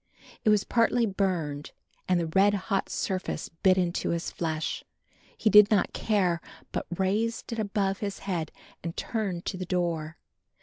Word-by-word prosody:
It - - +4
was 210 -2 +4
partly 235 0 +3
burned 180 -8 -1 0.4
and 180 -1 +4
the 170 - 0
red 195 +5 +4
hot 195 0 -1
surface 185 -4 -2
bit 185 +3 +3
into 175 -2 0
his 170 0 -2
flesh. 160 -2 -2 0.5
He - - -1
did 210 0 +9
not 210 - +2
care 185 -6 +1 0.3
but - - -3
raised 220 +5 0
it 230 - -3
above 200 -2 0
his 200 -2 -3
head 170 -5 -2 0.3
and 170 0 -5
turned 195 -7 -2
to 185 - -3
the 185 - -4
door. 165 -4 -1
190 Hz, 160 wpm, -28 LUFS, 170-205 Hz, 0.5 s, did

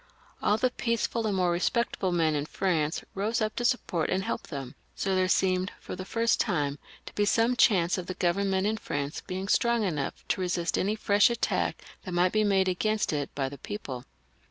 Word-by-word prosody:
All 210 - +3
the 255 +2 +1
peaceable 230 -1 -1
and 200 -2 0
more 180 -1 +2
respectable 190 +2 0
men 165 -3 +2
in 145 0 -1
France 160 -5 0
rose 215 +5 -1
up 215 -1 -1
to 240 - -1
support 240 -10 0
and 190 +1 0
help - - -3
them, 135 -4 -6 0.2
so 195 - -1
there 185 0 +2
seemed, 185 -1 +2
for - - -7
the 185 +1 -6
first 230 +3 +1
time, 145 -1 0 0.3
to - - -9
be 205 - +1
some 230 +4 +3
chance 185 -7 +4
of 175 - -6
the 185 - -4
Government 190 +2 +1
in 220 +1 +1
France 145 -7 -3
being 190 +1 -5
strong 235 +2 +2
enough 150 -8 -3
to - - 0
resist 175 -1 0
any 205 +3 +1
&esh 205 0 +4
attack 235 -1 -1 0.2
that 185 -3 -5
might 180 +1 +3
be 215 0 +2
made 195 -2 +3
against 210 +1 0
it 145 -2 -1
by 135 -2 0
the 140 0 -8
people. 135 -12 -6
190 Hz, 205 wpm, -28 LUFS, 170-215 Hz, 0.3 s, chance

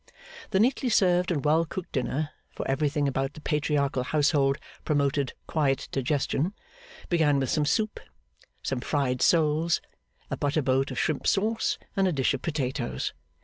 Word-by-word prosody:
The 190 - +2
neatly 250 +3 +2
served 180 -4 +3
and 150 -6 -1
well 155 +2 +4
cooked 170 +2 -6
dinner 140 +4 -1 0.2
(for - - -6
everything 145 +1 +1
about 135 +1 -1
the - - -9
Patriarchal 145 -3 0
household 140 0 +2 0.3
promoted 140 -2 +1
quiet 140 -4 0
digestion) 145 +6 0 0.5
began 155 -5 +3
with 135 -2 -1
some 150 - +2
soup, 215 +7 0 0.6
some 130 - -1
fried 130 -1 -1
soles, 160 0 +3 0.5
a - - -1
butter 145 +1 0
boat 135 +1 +2
of - - -6
shrimp 155 -3 0
sauce, 220 +3 +1 0.2
and 195 -1 +3
a - - +2
dish 135 -4 +1
of 135 - -3
potatoes. 135 -6 -2
150 Hz, 150 wpm, -27 LUFS, 135-165 Hz, 0.6 s, well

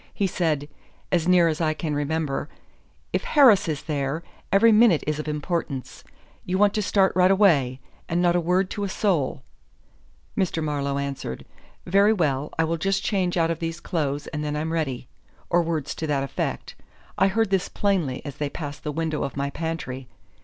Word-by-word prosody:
He 200 - +1
said, 160 -6 0 0.4
as 170 -2 +1
near 180 -2 +5
as 160 0 -1
I 155 -1 +1
can 155 -1 -3
remember: 145 0 -2 0.6
'If - - 0
Harris 245 - +5
is 150 -2 -3
there, 150 +1 -2 0.3
every 210 +4 +6
minute 215 -7 +5
is 155 0 -1
of 155 - -5
importance. 150 -3 -3 0.4
You 185 +1 -1
want 205 0 +4
to 215 - 0
start 195 -1 +2
right 185 0 +5
away. 155 -11 +3 0.3
And 170 - +1
not 175 -1 +3
a - - +4
word 180 +3 +1
to 205 - -3
a 200 - -2
soul.' 165 -9 0 0.9
Mr. 170 -4 0
Marlowe 140 -2 -1
answered: 140 - -4 0.4
'Very 200 +4 +4
well. 150 -7 0
I 160 - +3
will 165 +1 -1
just 195 +4 0
change 185 -4 0
out 165 -1 +2
of 165 - -3
these 165 0 -3
clothes 145 -5 -2
and 150 -1 -4
then 150 0 -2
I'm 160 +2 -2
ready' 135 -7 -2 0.4
or 175 - +4
words 160 -4 -2
to 160 - -4
that 140 -2 0
effect. 135 - -3 0.5
I 195 - +5
heard 220 +1 +1
this 195 -1 +1
plainly 175 -11 -1
as 140 -3 -7
they 145 -1 -2
passed 145 -1 -7
the 150 - -2
window 155 0 -2
of 140 -1 -5
my 140 0 -1
pantry. 145 -6 -4
160 Hz, 190 wpm, -24 LUFS, 145-185 Hz, 0.9 s, every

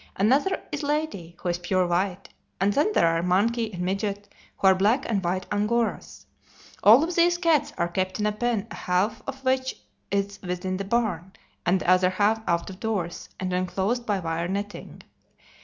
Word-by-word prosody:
Another 275 - +2
is 295 - -3
Lady, 290 - -2
who 180 - -3
is 175 0 -1
pure 185 +1 +1
white; 180 +2 -1 0.3
and 195 +2 +2
then 295 - +2
there - - +4
are 165 0 +2
Monkey 215 +6 +1
and 180 -2 -4
Midget, 200 +2 -2 0.3
who - - -3
are 190 - +8
black 210 +8 +2
and 200 -4 0
white 185 +2 -1
Angoras. 215 +3 -1 0.6
All 230 +8 +8
of 340 +2 -2
these 345 0 +4
cats 330 -5 +2
are 170 - +1
kept 185 +2 -2
in 210 - 0
a 210 - +2
pen, 225 -1 -1
half 195 +5 -1
of 270 0 -6
which 260 0 +1 0.3
is 200 0 -1
within 180 0 -3
the 195 - -4
barn, 195 -5 -1 0.3
and 185 +2 +3
the - - -5
other 185 0 +5
half 210 +4 +1
out 170 +1 0
of 185 - -12
doors 200 -7 -3
and 185 -1 -2
enclosed 190 +6 -1
by 205 -2 +1
wire 165 -1 -2
netting. 200 +2 -5
200 Hz, 185 wpm, -25 LUFS, 180-235 Hz, 0.6 s, are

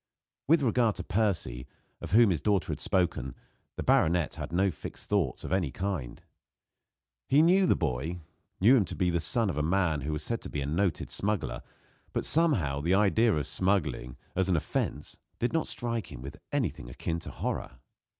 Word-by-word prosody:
With 160 0 +4
regard 115 -3 +2
to 90 - -5
Percy, 90 - -1 0.3
of - - -6
whom 115 -2 +6
his 80 - -1
daughter 100 -3 +1
had - - -4
spoken, 65 -9 0 0.4
the - - -4
baronet 85 -1 +3
had - - -6
no 95 +3 +2
fixed 80 - -9
thoughts 95 -11 0
of - - -3
any 90 -6 +1
kind. 90 -7 -4 1.1
He 145 +4 +6
knew 185 +3 +5
the - - +4
boy 80 +4 -2 0.4
knew 115 +8 +6
him 105 - +2
to - - -7
be 90 -1 +1
the 85 - +1
son 115 +7 +1
of 85 -6 -2
a - - +1
man 80 -2 +1
who 75 +3 -3
was 75 0 -3
said 115 +5 -2
to - - -8
be 75 - -3
a - - -2
noted 85 +3 -1
smuggler; 105 -1 -2 0.5
but, - - -1
somehow, 115 - +3
the 85 +5 +2
idea 105 +3 +4
of 75 -7 0
smuggling, 75 -10 0 0.2
as 95 0 +1
an 90 - +3
offence, 80 - -2 0.2
did 120 - -1
not 160 - +1
strike 115 -5 -3
him 65 -3 -9
with 70 - -8
anything 90 - -2
akin 80 +7 -3
to - - -8
horror. 65 - -4
90 Hz, 190 wpm, -29 LUFS, 75-110 Hz, 1.1 s, whom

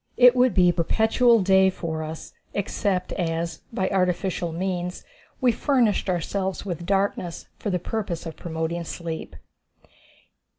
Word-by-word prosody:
It 250 0 +8
would 250 -5 +3
be 180 -1 +5
perpetual 220 +7 +3
day 190 0 +5
for 165 -4 -4
us, 155 +1 -7 0.2
except 195 -2 -1
as, 165 -2 -2
by 190 -5 0
artificial 180 -2 0
means, 180 +1 -3 0.4
we 255 -3 +4
furnished 235 -6 +1
ourselves 190 +2 -2
with 175 -3 -4
darkness 195 -3 -1
for 210 - -3
the 180 - +1
purpose 180 -2 -4
of 165 - -6
promoting 165 +1 -3
sleep. 165 -1 -6
180 Hz, 130 wpm, -25 LUFS, 170-200 Hz, 0.4 s, It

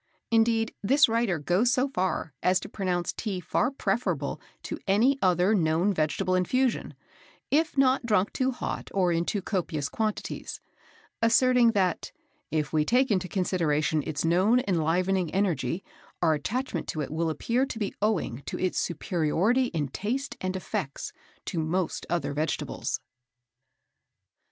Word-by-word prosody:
Indeed, 225 0 +3
this 275 +8 +5
writer 225 -5 +1
goes 180 +11 +2
so 255 +2 +2
far 185 - -2
as 185 +1 +3
to - - -7
pronounce 180 -4 -1
Tea 200 -5 -3
far 230 +8 0
preferable 185 - -2 0.2
to - - -5
any 240 +8 +3
other 180 +2 +3
known 170 +1 +2
vegetable 155 +2 0
infusion, 250 +8 +1 0.6
if 310 0 +2
not 260 -1 +4
drank 210 -4 +1
too 260 0 +1
hot 250 - -4
or 185 -3 +3
in 170 0 +1
too 200 0 -2
copious 160 -8 -2
quantities, 215 -1 -3 0.6
asserting 235 +1 +4
that 185 -4 0 0.4
"if 155 -2 -1
we 155 -1 +3
take 250 - +2
into 185 -2 +1
consideration 160 -5 0
its 155 +1 -3
known 195 +9 +3
enlivening 180 +1 +1
energy, 175 -4 0 0.4
our 165 -2 +3
attachment 205 - -2
to 155 - -3
it 140 - -4
will 165 +1 0
appear 240 - 0
to - - -6
be 205 -3 -2
owing 190 - 0
to - - -3
its 185 -1 0
superiority 175 - +1
in 160 - -2
taste 235 - -3
and 185 0 -2
effects 150 -6 -4 0.3
to 170 - -2
most 165 +2 -1
other 175 -4 -1
vegetables." 150 +2 -2
185 Hz, 145 wpm, -27 LUFS, 165-230 Hz, 0.6 s, this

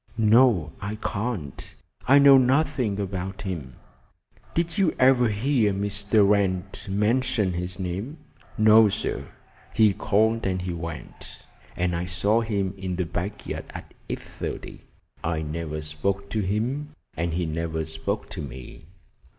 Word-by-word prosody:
"No, 110 -7 +4
I 100 +1 -3
can't. 105 - -4 0.3
I 135 +2 +7
know 140 -1 +8
nothing 130 -5 +1
about 95 -1 -4
him." 80 -10 -5 0.8
"Did 170 +4 0
you 185 -5 +3
ever 130 -2 +5
hear 110 0 +2
Mr. 100 +1 +2
Wrent 100 0 0
mention 105 0 +1
his 90 +1 -4
name?" 95 - -4 0.4
"No, 110 0 +7
sir. - - -3 0.5
He 110 -2 +5
called 110 +2 +1
and 95 -1 0
he 90 -1 -3
went, 80 -3 -7 0.3
and 90 0 0
I 85 +1 -2
saw 100 +6 +1
him 100 -4 -1
in 95 -1 -3
the 90 0 -1
back 90 +5 -4
yard - - -5
at - - -9 0.2
8.30. - - -6 0.4
I 80 -1 -1
never 75 0 -4
spoke 100 +6 -2
to 110 - 0
him, 125 +10 -2 0.2
and 85 0 -1
he 90 0 0
never 80 0 -2
spoke 90 +7 -3
to 90 - -5
me." 70 +3 -9
100 Hz, 140 wpm, -25 LUFS, 85-110 Hz, 0.8 s, know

